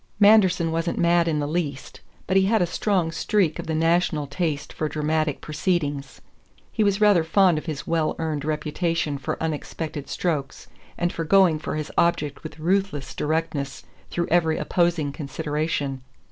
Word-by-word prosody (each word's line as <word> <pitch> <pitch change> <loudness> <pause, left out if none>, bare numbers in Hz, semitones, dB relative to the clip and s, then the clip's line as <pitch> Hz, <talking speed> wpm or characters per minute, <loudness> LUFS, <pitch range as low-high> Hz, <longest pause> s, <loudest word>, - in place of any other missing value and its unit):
Manderson 190 -5 +5
wasn't 165 +1 -1
mad 170 0 +3
in 160 -2 +1
the 145 -1 -1
least, 150 -4 -4 0.2
but 190 - -1
he 190 0 +5
had 220 +1 +3
a 180 - +3
strong 180 -1 0
streak 170 -1 0
of - - -5
the 160 - -1
national 165 -1 +2
taste 145 0 -3
for 155 - -2
dramatic 155 0 -1
proceedings; 150 -3 -2 0.5
he 220 - +1
was 200 -1 +2
rather 205 -5 +5
fond 175 -1 +3
of 155 - -13
his 155 -3 -4
well 165 -2 0
earned 155 -3 -2
reputation 155 0 -1
for 135 - -3
unexpected 155 -1 -4
strokes 150 -6 -2 0.3
and 175 0 0
for 165 - -3
going 175 -2 +4
for 150 - -4
his 155 -1 -4
object 155 -4 +1
with 155 - -9
ruthless 175 -4 -1
directness 150 -3 -2 0.3
through 170 -1 -2
every 160 -2 +3
opposing 170 -5 +1
consideration. 145 -1 -3
160 Hz, 160 wpm, -24 LUFS, 150-175 Hz, 0.5 s, Manderson